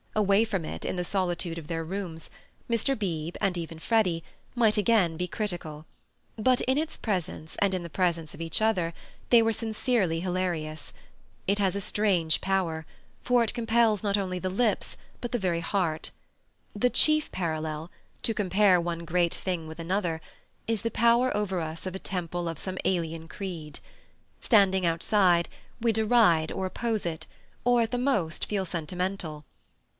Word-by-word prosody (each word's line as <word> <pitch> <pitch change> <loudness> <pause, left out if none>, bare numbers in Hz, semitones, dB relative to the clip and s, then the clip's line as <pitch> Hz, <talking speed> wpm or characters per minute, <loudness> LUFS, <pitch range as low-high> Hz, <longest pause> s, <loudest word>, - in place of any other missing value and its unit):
Away 205 0 +4
from 195 -7 -2
it, - - -6
in - - -2
the 180 - 0
solitude 175 -3 -1
of 160 -3 -7
their 165 0 -2
rooms, 175 -3 -5 0.4
Mr. 235 +4 +1
Beebe, 170 -5 -3
and 195 -3 +1
even 165 -1 -5
Freddy, 180 -5 +1 0.3
might 225 -3 +4
again 210 -6 +3
be 180 +2 -2
critical. 175 -8 -4 0.5
But 250 +3 +3
in 260 +2 +1
its 315 +1 -1
presence 180 -6 -3
and 200 -1 +3
in 185 -2 -2
the 170 - -7
presence 165 -3 0
of 155 - -9
each 165 +4 -1
other 180 -7 +1 0.4
they 235 -1 +7
were 225 0 +2
sincerely 220 -6 +1
hilarious. 175 -4 -2 0.6
It 200 +2 +2
has 195 -2 +2
a 200 - -1
strange 185 -6 +1
power, 175 -5 0 0.4
for 245 -1 +3
it 225 - -1
compels 230 -3 +2
not 200 -1 +2
only 185 -2 -2
the 185 +1 -2
lips, 210 +2 0 0.2
but 240 - -4
the 245 - +1
very 175 -4 0
heart. 165 -3 -1 0.7
The 245 +5 +3
chief 310 +3 +4
parallel 155 -2 -3 0.3
to 225 - +2
compare 195 -2 +4
one 170 0 -3
great 170 0 +2
thing 180 -4 -3
with 160 +1 -9
another—is 180 +4 -3
the 230 +1 -1
power 235 +1 +3
over 190 -4 -1
us 160 +2 -5
of 185 0 -4
a - - -4
temple 175 -2 -3
of 165 - -6
some 185 -1 -4
alien 165 -3 -1
creed. 165 -5 -6 0.6
Standing 190 -5 +4
outside, 170 +1 +3 0.3
we 230 0 +2
deride 215 -8 +4
or 190 - -2
oppose 220 +2 -2
it, 160 -1 -4 0.4
or 245 -1 +4
at 225 - -3
the 245 - 0
most 210 - 0
feel 200 -2 -1
sentimental. 170 -2 -3
185 Hz, 165 wpm, -28 LUFS, 165-215 Hz, 0.7 s, they